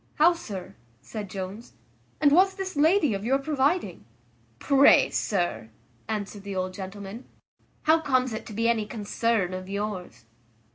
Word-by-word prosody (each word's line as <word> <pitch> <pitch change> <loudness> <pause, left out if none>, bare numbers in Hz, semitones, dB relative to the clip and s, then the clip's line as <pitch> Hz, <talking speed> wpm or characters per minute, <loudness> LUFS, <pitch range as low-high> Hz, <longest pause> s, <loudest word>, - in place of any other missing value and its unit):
"How, 330 +4 +5
sir," 200 - -8 0.3
said 210 -3 -6
Jones, 195 +4 -7 0.5
"and 290 -2 +4
was 380 +5 +5
this 380 -2 -5
lady 310 - +3
of 195 0 -4
your 260 +4 +2
providing?" 275 - 0 0.5
"Pray, 275 - +5
sir," 175 - -1 0.4
answered 205 -1 -4
the 200 0 -6
old 185 0 -2
gentleman, 200 +4 -8 0.6
"how 320 +1 +5
comes 255 -5 +1
it 220 - -6
to 215 - -8
be 230 +2 0
any 225 -3 +1
concern 215 -3 -1
of 185 0 -6
yours?" 195 - -5
220 Hz, 145 wpm, -26 LUFS, 195-280 Hz, 0.6 s, How